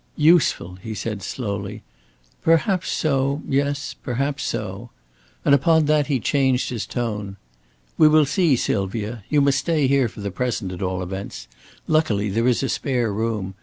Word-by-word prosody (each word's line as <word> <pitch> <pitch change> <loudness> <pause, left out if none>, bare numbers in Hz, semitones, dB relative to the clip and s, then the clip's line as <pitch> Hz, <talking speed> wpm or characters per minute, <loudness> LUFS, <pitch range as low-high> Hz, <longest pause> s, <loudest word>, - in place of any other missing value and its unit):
"Useful," 150 - +3
he 110 +1 -6
said, 105 -2 -4
slowly. 100 -5 -5 0.6
"Perhaps 170 +3 +2
so, 140 -1 0
yes, 140 +1 -1
perhaps 140 +3 -3
so." - - -4 0.6
And 140 - +5
upon 160 +2 +4
that 150 -1 +2
he 140 -4 +1
changed 130 +1 +1
his 115 -3 -4
tone. 105 -5 -4 0.6
"We 155 - +8
will 155 0 +5
see, 155 0 +2
Sylvia. 105 0 -2
You 150 -1 +3
must 140 -1 +3
stay 160 -4 +1
here 135 -1 +3
for 105 - -10
the 100 -1 -3
present, 115 -2 -2
at 90 - -7
all 95 -1 -2
events. 90 -10 -6 0.4
Luckily, 110 -11 +1
there 115 +5 +1
is 125 +1 +2
a 135 - -1
spare 120 -6 -1
room. 105 -3 -2
125 Hz, 160 wpm, -22 LUFS, 105-145 Hz, 0.6 s, We